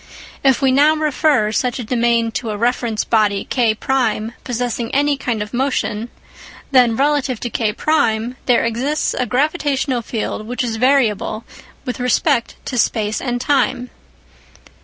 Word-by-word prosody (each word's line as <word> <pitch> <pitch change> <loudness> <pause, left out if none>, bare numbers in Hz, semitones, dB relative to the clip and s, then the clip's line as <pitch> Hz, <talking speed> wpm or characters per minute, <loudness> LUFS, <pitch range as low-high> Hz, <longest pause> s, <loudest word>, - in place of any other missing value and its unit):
If 270 0 +3
we 265 - +4
now 295 +4 +4
refer 300 -7 +1
such 245 +2 -1
a 250 - -4
domain 235 0 +1
to 225 - -4
a 210 - -3
reference 235 -1 0
body 210 -3 +1
K1 235 -1 0
possessing 240 -1 -3
any 290 +1 +3
kind 240 -5 -2
of 210 - -12
motion, 240 -3 -1 0.6
then 250 -4 +5
relative 275 -2 +1
to 240 - -4
K1 225 0 0
there 245 -2 +3
exists 260 +7 -1
a 250 - -1
gravitational 280 -2 0
field 215 -1 -4
which 245 +2 -2
is 230 -2 -2
variable 230 -4 +1 0.4
with 250 -1 -4
respect 250 0 +1
to 250 - -2
space 215 -2 0
and 245 -2 -2
time. 250 -2 0
245 Hz, 140 wpm, -18 LUFS, 225-270 Hz, 0.6 s, then